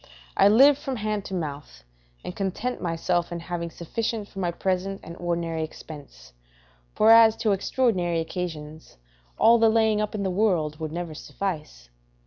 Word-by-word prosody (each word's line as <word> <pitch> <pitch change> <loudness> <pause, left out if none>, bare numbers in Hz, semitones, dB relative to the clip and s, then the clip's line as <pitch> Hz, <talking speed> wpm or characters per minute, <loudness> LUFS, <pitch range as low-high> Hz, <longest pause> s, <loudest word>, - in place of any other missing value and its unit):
I 195 - +5
live 270 +7 +6
from 270 -4 -4
hand 215 -2 -3
to 190 - -5
mouth, 145 - -6 0.4
and 180 - -6
content 200 +6 -3
myself 175 0 -1
in 170 - -4
having 170 0 -4
sufficient 210 +6 -4
for 195 - -10
my 180 -2 0
present 190 +2 -2
and 170 - -9
ordinary 170 -2 -2
expense; 140 - -11 0.6
for 220 - +5
as 225 -1 +7
to 220 -2 0
extraordinary 190 -4 0
occasions, 160 -2 -6 0.4
all 235 +1 +5
the 225 0 +5
laying 220 -1 +2
up 210 0 -3
in 205 - -2
the 190 - -1
world 175 -7 0
would 155 -1 -4
never 170 -1 -5
suffice. 155 - -6
180 Hz, 160 wpm, -25 LUFS, 165-215 Hz, 0.6 s, as